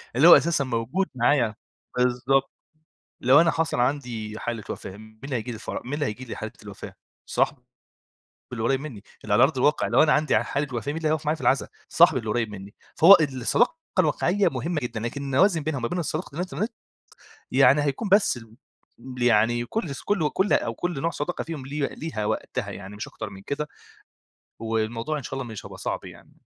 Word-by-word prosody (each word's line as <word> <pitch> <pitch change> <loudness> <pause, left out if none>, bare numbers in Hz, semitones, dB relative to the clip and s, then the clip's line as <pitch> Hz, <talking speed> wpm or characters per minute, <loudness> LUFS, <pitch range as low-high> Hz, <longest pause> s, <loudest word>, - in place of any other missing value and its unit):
اللي 145 +6 +6
هو 175 - +11
أساسًا 170 -4 +1
موجود 130 +9 -1
معايا 120 -3 +2 0.4
بالضبط. 125 +2 +2 0.7
لو 135 +5 +6
أنا 170 - +4
حصل 160 -7 -1
عندي 120 -5 -2
حالة 115 -3 -4
وفاة، 95 - -6
مين 110 0 -15
هييجي 125 -1 -2
لي - - -4
الفَرَ 110 - -5
مين 130 - -4
اللي 145 -1 -1
هييجي 115 +5 -5
لي 115 - -7
حالة - - -6
الوفاة؟ - - -9 0.3
صاحبي - - 0 0.9
اللي 115 -2 -4
قريب 135 +3 +2
منّي 130 -9 -8 0.2
اللي 105 - -1
على 105 - +6
أرض 140 0 +2
الواقع 145 +4 +2
لو - - +5
أنا 150 - +4
عندي 150 +1 +2
حالة 145 +1 -2
وقاة 120 -3 -3
مين 150 - -2
اللي 160 -1 -1
هيُقف 155 0 -1
معايا 150 +1 +1
في 160 - -12
العزا؟ 135 - +2 0.2
صاحبي 165 -5 +5
اللي 110 -2 -6
قريب 115 0 0
منّي، 100 0 -9 0.2
فهو 175 +5 +9
الصداقة 140 - +1 0.3
الواقعية 180 +4 +2
مهمة 145 +5 -3
جدًا، 120 -2 -4
لكن 120 +5 -4
إنّي 135 -1 -2
أوازن 180 -4 +4
بينها 155 -1 -2
وما 120 - -1
بين 175 +5 -2
صداقة 155 -1 -4
الانترنت، 180 - -3 0.8
يعني 135 +2 +5
هيكون 145 +9 -2
بس 200 -7 +4
ال 115 -1 -13 0.7
يعني 120 0 +3
كل 170 - -3
ص - - -8
كل 175 -8 0
كل 195 +2 +1
أو 115 - +1
كل 175 +1 -3
نوع 165 - 0
صداقة 170 +2 -3
فيهم 155 -5 -6
ليه 140 +1 -1
ليها 150 -10 -4
وقتها - - -3
يعني 100 +1 -9
مش 105 - -6
أكتر - - -7
من 95 -1 -11
كده. 150 +6 -4 0.9
والموضوع 115 +5 -2
إن 145 - -7
شاء - - -7
الله 135 0 -3
مش 105 - -8
هيبقى - - -9
صعب - - -4
يعني. - - -13
135 Hz, 200 wpm, -25 LUFS, 115-155 Hz, 0.9 s, هو